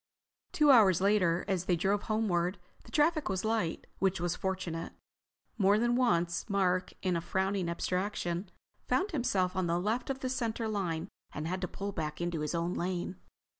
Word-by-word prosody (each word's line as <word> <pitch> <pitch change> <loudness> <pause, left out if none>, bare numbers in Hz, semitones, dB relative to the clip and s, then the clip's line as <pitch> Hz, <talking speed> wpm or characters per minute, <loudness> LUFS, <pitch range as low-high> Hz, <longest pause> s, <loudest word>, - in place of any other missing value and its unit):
Two 300 -2 +5
hours 205 -9 +6
later, 185 -3 +2
as 185 -3 0
they 180 - +2
drove 195 +4 +1
homeward, 190 -4 +1 0.3
the - - -14
traffic 310 0 +2
was 190 +2 -1
light, 220 -7 -1
which 190 -2 +1
was 175 0 -1
fortunate. 185 -4 -3 0.7
More 200 +1 +5
than 240 +2 +2
once 175 -7 +1
Mark, 185 -2 +1
in 185 -2 +1
a 170 - 0
frowning 190 0 0
abstraction, 180 0 -2 0.4
found 390 +3 +1
himself 195 - 0
on 185 -2 0
the 170 +1 +1
left 220 +8 -1
of 265 -1 -3
the 260 - -1
center 230 -3 -1
line 180 -5 -2 0.3
and 150 +2 -4
had 185 +2 -2
to 180 - -1
pull 200 +2 -5
back 155 -4 -4
into 175 -2 -2
his 150 +2 -2
own 170 +1 0
lane. 180 0 -2
190 Hz, 175 wpm, -31 LUFS, 175-215 Hz, 0.7 s, hours